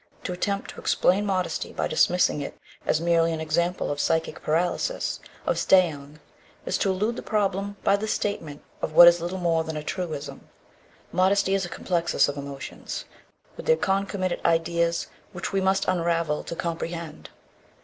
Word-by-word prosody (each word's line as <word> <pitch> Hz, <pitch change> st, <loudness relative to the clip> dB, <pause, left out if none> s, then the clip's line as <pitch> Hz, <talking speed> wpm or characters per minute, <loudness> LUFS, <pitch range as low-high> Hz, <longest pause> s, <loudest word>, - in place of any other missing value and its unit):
To 180 Hz, -, -3 dB
attempt 200 Hz, +2 st, -2 dB
to -, -, -11 dB
explain 200 Hz, +3 st, +2 dB
modesty 185 Hz, -2 st, -1 dB
by -, -, -1 dB
dismissing 180 Hz, -4 st, +2 dB
it 140 Hz, -, -6 dB, 0.3 s
as 155 Hz, -, +3 dB
merely 165 Hz, 0 st, +2 dB
an 160 Hz, -, -3 dB
example 170 Hz, +3 st, 0 dB
of 145 Hz, -, -3 dB
psychic 160 Hz, +2 st, 0 dB
paralysis, 175 Hz, -, -1 dB, 0.3 s
of -, -, +1 dB
Stauung, 155 Hz, -6 st, +2 dB, 0.5 s
is -, -, -1 dB
to 200 Hz, -, +1 dB
elude 210 Hz, +5 st, 0 dB
the -, -, -4 dB
problem 200 Hz, -1 st, -1 dB
by 200 Hz, -, +4 dB
the 215 Hz, +2 st, -4 dB
statement 160 Hz, -9 st, -3 dB, 0.2 s
of -, -, -3 dB
what 170 Hz, +2 st, +10 dB
is 170 Hz, 0 st, +6 dB
little 175 Hz, +2 st, -3 dB
more 165 Hz, -3 st, +1 dB
than 160 Hz, -1 st, -5 dB
a 150 Hz, -, -5 dB
truism. 155 Hz, -4 st, -5 dB, 0.6 s
Modesty 190 Hz, +2 st, +3 dB
is 195 Hz, -1 st, +1 dB
a -, -, -7 dB
complexus 170 Hz, -2 st, +1 dB
of 145 Hz, -, -3 dB
emotions 140 Hz, -1 st, -6 dB, 0.5 s
with -, -, -9 dB
their 480 Hz, 0 st, +5 dB
concomitant 195 Hz, -, -1 dB
ideas 170 Hz, 0 st, +1 dB, 0.3 s
which 175 Hz, +3 st, -5 dB
we 195 Hz, -, +2 dB
must 190 Hz, +1 st, +1 dB
unravel 170 Hz, -3 st, 0 dB
to -, -, -5 dB
comprehend. 170 Hz, -1 st, -5 dB
175 Hz, 165 wpm, -25 LUFS, 160-190 Hz, 0.6 s, what